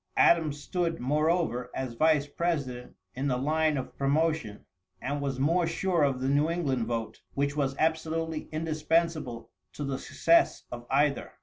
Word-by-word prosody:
Adams 155 -4 +4
stood, 170 +2 -2
moreover, 150 -2 0
as 130 -2 -3
vice 155 +3 +3
president, 145 -6 -3 0.2
in 135 +3 -2
the 125 -2 +1
line 155 +2 +1
of 130 - -5
promotion, 140 -5 0 0.3
and 140 +3 -3
was 135 -2 -2
more 165 +5 +2
sure 175 0 0
of 135 -3 +1
the 130 - 0
New 145 +3 +3
England 135 -9 -1
vote, 115 -1 -4
which 140 +1 0
was 135 -2 0
absolutely 160 0 -1
indispensible 155 -4 -1 0.2
to 145 - -5
the 135 -1 -2
success 335 0 +2
of 120 0 -7
either. 140 +1 +1
145 Hz, 150 wpm, -28 LUFS, 130-160 Hz, 0.3 s, Adams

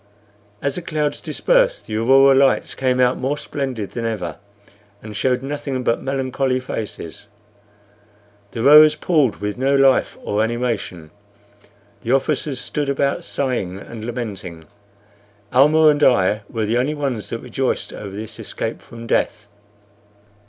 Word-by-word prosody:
As 140 - 0
the 180 - -4
clouds 150 -3 -2
dispersed - - +1
the 110 - -5
aurora 135 +4 +5
lights 135 0 +3
came 130 -1 0
out 125 0 +3
more 135 +3 -1
splendid 130 -8 -4
than 120 - -5
ever, 100 -8 -3 0.7
and 105 -1 -8
showed 125 +3 0
nothing 140 -2 -4
but 115 - 0
melancholy 135 -1 -1
faces. 110 -9 -6 1.2
The 115 - -5
rowers 150 +2 +8
pulled 150 - +1
with 105 +3 -5
no 135 +2 +2
life 135 -1 +3
or 105 +1 0
animation; 110 -9 -3 0.9
the 120 - 0
officers 135 0 0
stood 145 +1 -3
about 140 0 0
sighing 120 -10 -2
and 110 +2 -9
lamenting; 100 -8 -6 0.9
Almah 155 +4 +6
and 145 0 +2
I 105 -5 +3
were 110 -2 -2
the 115 +3 +1
only 145 +5 0
ones 135 -7 -3
that 115 - -3
rejoiced 125 +2 -2
over 100 -2 -8
this 110 +1 -7
escape - - -5
from 115 0 -11
death. 105 -2 -1
125 Hz, 140 wpm, -20 LUFS, 110-140 Hz, 1.2 s, rowers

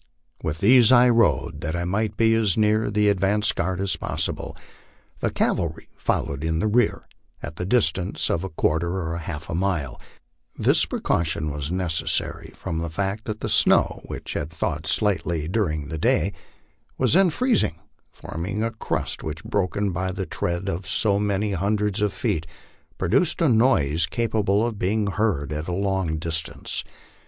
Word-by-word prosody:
With 80 +1 -3
these 120 +2 +6
I 125 0 +7
rode, 100 -9 +2
that 80 +3 -3
I 85 0 -2
might 105 +3 -1
be 115 0 +4
as 110 -5 +2
near 110 0 +2
the 105 0 +2
advance 100 +2 +2
guard 90 +1 -2
as 100 -1 0
possible. - - -3 0.6
The - - 0
cavalry - - -1
followed 70 +1 -1
in 80 0 0
rear, 110 +3 +2 0.4
at 75 +2 -7
the 90 - -3
distance 100 -5 +1
of 85 - 0
a 95 - -4
quarter 85 +3 0
or 85 -3 -3
half 80 -1 -6
a - - -5
mile; 85 -7 -1 0.6
this - - +4
precaution 80 -2 -1
was 75 +1 -4
necessary, 90 -3 -1
from 80 - -4
the 85 0 -3
fact 100 +5 -3
that 110 -1 -5
the - - -2
snow, - - +3
which - - -6
had 75 - -3
thawed 80 -2 -3
slightly 85 -7 0
during 80 -7 -1
the 80 -1 -4
day, 95 +5 +2 0.6
was - - +2
then 190 +1 +5
freezing, 235 - +1 0.4
forming 95 +6 -4
a 115 - -1
crust 110 - -3
which, 80 0 -6
broken 100 0 -1
by 90 +2 -2
the 95 0 -4
tread 85 +2 -3
of 90 0 -3
so 100 -2 +2
many 105 0 0
hundreds 100 +2 0
of 105 -1 +2
feet, 80 -2 -2 0.5
produced 160 - +1
a 165 - +3
noise 85 - +3
capable 110 -1 +1
of 115 -4 -4
being 105 +3 +1
heard 100 -9 0
at 75 +1 -4
a - - -2
long 95 -3 0
distance. 80 +1 -3
95 Hz, 165 wpm, -24 LUFS, 80-105 Hz, 0.6 s, I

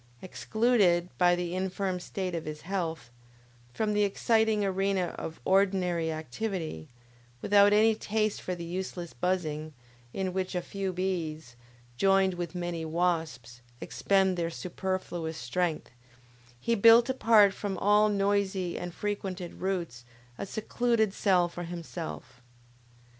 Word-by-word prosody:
Excluded, 195 -4 +2
by 175 -1 +5
the 175 0 -3
infirm 190 0 -2
state 185 0 -4
of 165 -2 -4
his 150 0 -6
health, 165 -8 -4 0.6
from 210 - -1
the 210 - +2
exciting 220 +1 +2
arena 195 -2 0
of 160 - -7
ordinary 185 -4 +2
activity, 160 - -4 0.5
without 205 +6 +5
any 220 +2 +5
taste 215 0 -1
for 180 - -3
the 170 -1 -7
useless 175 -1 -5
buzzing, 155 -4 -2 0.4
in 185 +3 -3
which 185 0 -2
a 180 - 0
few 195 0 -3
bees, 165 -7 -3 0.4
joined 195 +2 +3
with 175 0 -5
many 175 -2 -3
wasps, 160 -8 -2 0.2
expend 190 -2 +1
their 165 -1 -1
superfluous 175 -2 -4
strength, 155 +7 -2 0.7
he 235 - 0
built 230 +2 +7
apart 225 -6 +5
from 200 -2 -4
all 210 +2 +4
noisy 195 -3 0
and 175 -1 -6
frequented 195 -4 -4
routes 175 -10 -3 0.3
a - - -6
secluded 220 0 0
cell 185 -4 +3
for 175 0 -7
himself. 165 -7 -7
185 Hz, 125 wpm, -29 LUFS, 170-200 Hz, 0.7 s, built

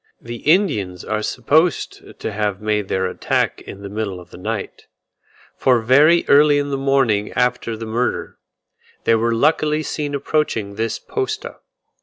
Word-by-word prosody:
The 120 0 -7
Indians 115 - +1
are 110 0 -1
supposed 150 +10 0
to - - -3
have 105 -2 -2
made 105 -2 -1
their 95 0 0
attack 90 - -1
in 100 - -10
the - - -5
middle 100 -3 -4
of 90 - -15
the - - -11
night; - - -5 0.7
for 125 -2 +3
very 145 +9 +5
early 145 +1 +6
in 145 0 -1
the - - 0
morning 135 -7 +1
after 125 -2 0
the 115 - -6
murder, 115 +3 -2 0.6
they - - +3
were 115 +1 +2
luckily 150 +3 +2
seen 145 -2 -3
approaching 140 -8 -1
this 110 +2 -2
posta. 425 +1 -4
120 Hz, 155 wpm, -20 LUFS, 105-145 Hz, 0.7 s, early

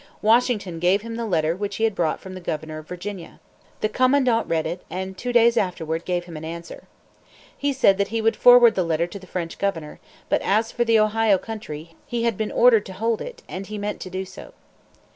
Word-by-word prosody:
Washington 215 -6 +2
gave 185 +4 +2
him 230 0 -6
the 230 0 -3
letter 165 -4 +1
which 205 +2 -4
he 225 - -2
had 225 -1 +2
brought 170 -5 -1
from 190 - -10
the 185 - -8
governor 155 -2 -4
of 155 - -13
Virginia. 180 0 -7 0.4
The 215 - +1
commandant 255 -2 +2
read 160 -1 0
it, 175 +3 -4
and 190 +2 -5
two 245 +6 -4
days 235 -1 +4
afterward 165 -3 -1
gave 175 -1 -1
him 170 -2 -10
an 155 - -7
answer. 170 +1 -8 0.7
He 285 0 -1
said 200 -7 +3
that 200 - +2
he 225 +2 -2
would 225 0 +2
forward 245 -2 +7
the 185 - 0
letter 165 0 0
to 190 +3 -9
the 185 - -14
French 170 -3 -5
governor; 165 -7 -3 0.3
but - - +1
as 220 +3 +1
for 240 - 0
the 230 -1 +3
Ohio 215 -1 +3
Country, 170 -7 -8
he 235 -1 -2
had 235 -2 +1
been 215 +2 -3
ordered 235 -3 +4
to 190 - -8
hold 225 +4 -1
it, - - -8
and 190 +1 -6
he 215 - -6
meant 205 0 -4
to 185 - -6
do 185 +1 -4
so. - - -12
200 Hz, 225 wpm, -23 LUFS, 175-225 Hz, 0.7 s, forward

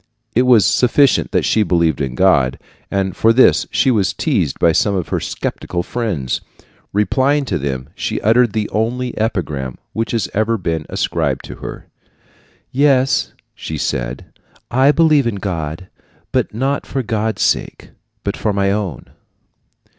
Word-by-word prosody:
It 125 +2 +3
was 115 -7 +6
sufficient 130 +7 +3
that - - +1
she 110 - +2
believed 85 -6 +1
in 65 -3 -2
God; 70 -9 +3 0.3
and 95 -2 -1
for 115 - +4
this 130 +3 +4
she 130 - +2
was 100 -6 +1
teased 100 - 0
by 85 - +4
some 100 +5 +1
of 90 -3 -3
her - - 0
skeptical 85 0 -4
friends. 95 - -2 0.5
Replying 135 +8 +1
to 95 -9 -2
them, 65 -2 -3
she - - -3
uttered 115 0 +3
the 110 -1 -1
only 120 +3 -1
epigram 75 - -2 0.2
that 115 0 -2
has 115 -5 -1
ever 110 +2 +1
been 80 -5 -3
ascribed - - -1
to - - -9
her. - - -8 0.9
"Yes," 135 -1 +2 0.2
she 80 - -6
said, 60 -3 -3 0.5
"I 130 +3 +5
believe 150 -5 +3
in 115 - -1
God, 90 -3 -4 0.6
not 135 +6 -2
for 135 -1 -2
God's 110 -1 -1
sake, - - -1 0.3
but - - -2
for 105 - -1
my 100 0 +1
own." 100 - -3
105 Hz, 150 wpm, -18 LUFS, 85-125 Hz, 0.9 s, was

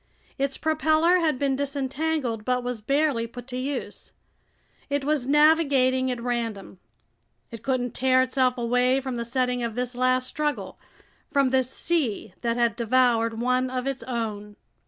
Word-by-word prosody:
Its 275 0 -1
propeller 315 +3 +3
had 315 -5 +1
been 275 0 0
disentangled 280 -3 -2
but 250 +1 0
was 245 -3 -4
barely 275 -1 +1
put 245 +1 -10
to 250 -1 -7
use. 265 +2 -5 0.8
It 285 -1 -1
was 295 -4 0
navigating 280 -4 +4
at 250 -1 -2
random. 230 -6 -4 0.7
It 230 -2 -8
couldn't 250 -1 -1
tear 260 0 +3
itself 255 -1 +1
away 250 +2 +2
from 260 -2 -4
the 235 - -2
setting 250 0 -1
of 230 -2 -3
this 250 0 -2
last 255 +1 +1
struggle, 300 +1 -3 0.5
from 275 -2 +2
this 260 -1 +2
sea 260 - -1
that 235 -1 -1
had 235 -2 +2
devoured 230 -1 +2
one 255 +1 +1
of 255 0 -3
its 270 -2 -3
own! 220 -4 -4
255 Hz, 155 wpm, -25 LUFS, 240-275 Hz, 0.8 s, navigating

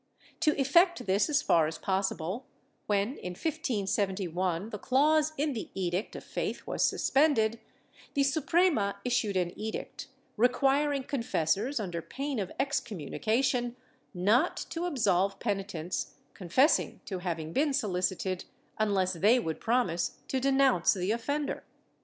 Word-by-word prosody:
To 305 -2 +2
effect 340 +1 +4
this 200 +8 +2
as 290 -1 +2
far 160 -2 +4
as 160 0 -5
possible, 190 +4 -2 0.4
when, 205 +6 0
in 180 - -5
1571, 195 - -1
the 210 - -5
clause 300 +5 +3
in 295 +1 0
the 225 - -5
Edict 185 +1 -2
of - - -7
Faith - - -4
was - - -3
suspended, 235 -6 +2 0.6
the 280 - +3
Suprema 290 - +2
issued 215 -5 +1
an 175 -1 0
edict 220 +1 -5 0.3
requiring 275 +4 +2
confessors, 230 - 0
under 175 -5 -3
pain 275 - -4
of 190 -3 -3
excommunication, 240 - -1 0.4
not 215 - +2
to 335 +1 -2
absolve 200 - +1
peni 195 -3 -2
tents 170 -2 -4 0.2
confessing 230 - +2
to 190 -4 -4
having 165 -3 -4
been 290 +2 +2
solicited, 185 -6 -1 0.3
unless 195 -3 +1
they 210 +9 +4
would 160 -9 -3
promise 225 -8 0
to 265 - 0
denounce 270 -8 +3
the 185 +2 -1
offender. 285 +6 -2
220 Hz, 130 wpm, -30 LUFS, 185-275 Hz, 0.6 s, effect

